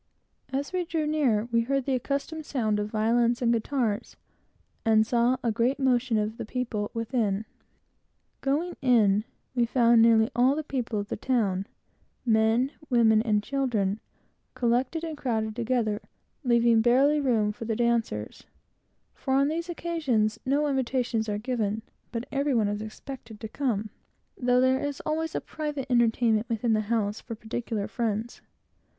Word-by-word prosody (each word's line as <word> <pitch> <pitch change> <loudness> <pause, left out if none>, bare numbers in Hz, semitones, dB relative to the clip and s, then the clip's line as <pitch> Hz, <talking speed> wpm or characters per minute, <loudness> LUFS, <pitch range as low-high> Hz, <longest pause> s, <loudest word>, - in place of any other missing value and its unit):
As 280 +5 -3
we 365 -1 0
drew 325 -2 -2
near, 275 -9 +1
we 230 0 +3
heard 270 +2 -1
the 275 - 0
accustomed 280 +5 -2
sound 220 -8 -1
of 210 0 -2
violins 230 +2 +2
and 235 -1 +2
guitars, 230 -2 -1 0.7
and 220 -1 +4
saw 240 +2 +2
a 235 - +1
great 240 +5 +1
motion 250 -3 +2
of 215 +1 -1
the - - -4
people 220 -3 -3
within. 225 -3 -1 1.0
Going 310 +6 0
in, 215 -5 +4 0.3
we 240 -2 +2
found 235 -1 +4
nearly 225 +1 +5
all 255 +3 +4
the 310 - -2
people 250 -6 -3
of 205 - -5
the - - -2
town 200 -7 0 0.6
men, 225 +3 +3 0.2
women, 225 -3 +4
and 210 -3 +1
children 220 -7 0 0.6
collected 250 +7 0
and 320 -2 -4
crowded 220 -6 -2
together, 230 -3 0 0.4
leaving 235 -2 +4
barely 270 +6 +4
room 230 -7 +2
for 230 +2 -8
the 225 0 -1
dancers; 230 - -1 0.7
for 265 -1 -1
on 275 +1 +3
these 335 +3 -3
occasions 290 -11 0
no 285 +3 +2
invitations 250 -4 0
are 205 - -1
given, 220 -2 -2 0.3
but 235 0 -3
every 280 -1 +1
one 220 -3 +3
is 205 +1 -2
expected 225 0 -9
to 220 - -5
come, 215 -4 -2 0.4
though 250 0 +2
there 260 +1 +3
is 285 -1 -3
always 320 +1 -2
a - - +1
private 295 -4 -4
entertainment 230 -2 +2
within 230 0 +1
the 215 - +2
house 210 -1 -1
for 230 - -7
particular 220 -1 -4
friends. 230 -1 -3
235 Hz, 155 wpm, -27 LUFS, 220-270 Hz, 1.0 s, nearly